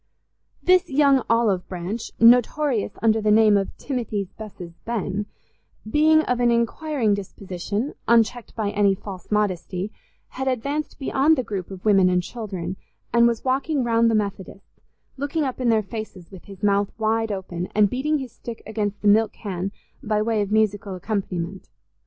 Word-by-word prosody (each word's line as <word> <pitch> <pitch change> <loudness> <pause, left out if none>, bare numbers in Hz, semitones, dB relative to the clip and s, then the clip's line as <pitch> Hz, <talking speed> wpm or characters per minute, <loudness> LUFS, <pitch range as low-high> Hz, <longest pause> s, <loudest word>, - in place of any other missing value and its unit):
This 365 0 +4
young 275 -1 +4
olive 225 -6 +2
branch, 185 +5 -5
notorious 245 +1 +4
under 220 -1 +3
the 215 - +1
name 215 0 +6
of 195 -1 -1
Timothy's 220 -8 -3
Bess's 185 -6 -9
Ben, 210 -3 -2 0.6
being 310 +6 +4
of 250 -4 -1
an 240 -1 +3
inquiring 235 0 +1
disposition, 200 - -4
unchecked 235 0 +2
by 210 -3 -1
any 205 -1 +3
false 185 -2 -9
modesty, 200 -1 -1 0.4
had 265 +1 -4
advanced 280 +4 -2
beyond 280 +3 +2
the 255 - 0
group 195 -5 -5
of 190 0 -10
women 195 -3 +5
and 180 -1 +1
children, 190 -5 -5 0.4
and 235 0 +6
was 235 +1 -2
walking 270 +2 +1
round 230 -1 +3
the 225 - +2
Methodists, 200 -2 -5 0.4
looking 285 +3 -1
up 260 -2 -3
in 245 - +2
their 220 -2 +3
faces 205 -4 -8
with 190 -3 -12
his 195 -2 -13
mouth 200 0 +2
wide 225 0 0
open, 180 -2 -4
and 210 -1 +5
beating 300 +5 0
his 260 -4 -6
stick 235 0 -9
against 210 -2 -3
the - - +2
milk 220 +2 +4
can 195 -2 -4 0.3
by 215 -1 0
way 215 0 +1
of 205 0 -3
musical 205 -2 +1
accompaniment. 185 -2 -4
215 Hz, 165 wpm, -23 LUFS, 195-245 Hz, 0.6 s, name